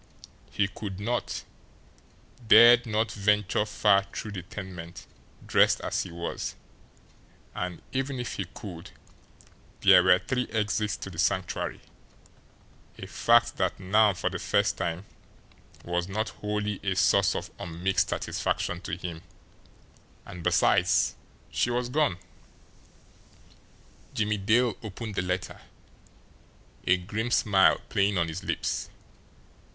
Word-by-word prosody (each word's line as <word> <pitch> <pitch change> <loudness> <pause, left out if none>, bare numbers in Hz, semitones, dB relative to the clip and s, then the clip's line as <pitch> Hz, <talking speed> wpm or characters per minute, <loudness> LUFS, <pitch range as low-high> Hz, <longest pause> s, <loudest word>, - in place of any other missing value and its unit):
He 100 - 0
could 100 -1 -7
not, 120 +4 -2 1.0
dared 120 +2 +8
not 110 0 0
venture 105 0 +1
far 100 -2 +3
through 105 - -6
the 95 -3 -5
tenement 90 -2 -9 0.4
dressed - - +4
as - - -1
he - - -7
was; 85 0 -5 1.0
and 90 -2 -5
even 135 0 -2
if 120 - -4
he 95 - -3
could 90 -1 -10 0.9
there - - +7
were - - +6
three 125 -1 -2
exits 105 -1 -1
to 95 - -8
the 80 - -9
Sanctuary, 95 -1 -1 1.2
a - - -7
fact 120 0 +3
that 95 -1 -1
now 100 +1 +3
for 90 - -2
the - - -4
first - - +1
time 85 +3 -3 0.8
was 85 0 -1
not 110 +3 -2
wholly 105 -1 -3
a - - -1
source - - +3
of - - -5
unmixed 90 +3 -1
satisfaction 90 0 -2
to 80 -4 -4
him; 85 -2 -6 1.0
and 90 - -9
besides 90 +1 +3 0.4
she - - +1
was 120 0 -1
gone! 145 - +1 2.0
Jimmie 105 0 0
Dale 115 +4 +2
opened 110 0 -6
the 95 - -1
letter, 90 0 -3 1.3
a 90 - +5
grim 105 +6 -3
smile 100 -5 +4
playing 100 0 +1
on 85 -1 +1
his 80 +3 -6
lips. - - -2
100 Hz, 125 wpm, -27 LUFS, 90-110 Hz, 2.0 s, dared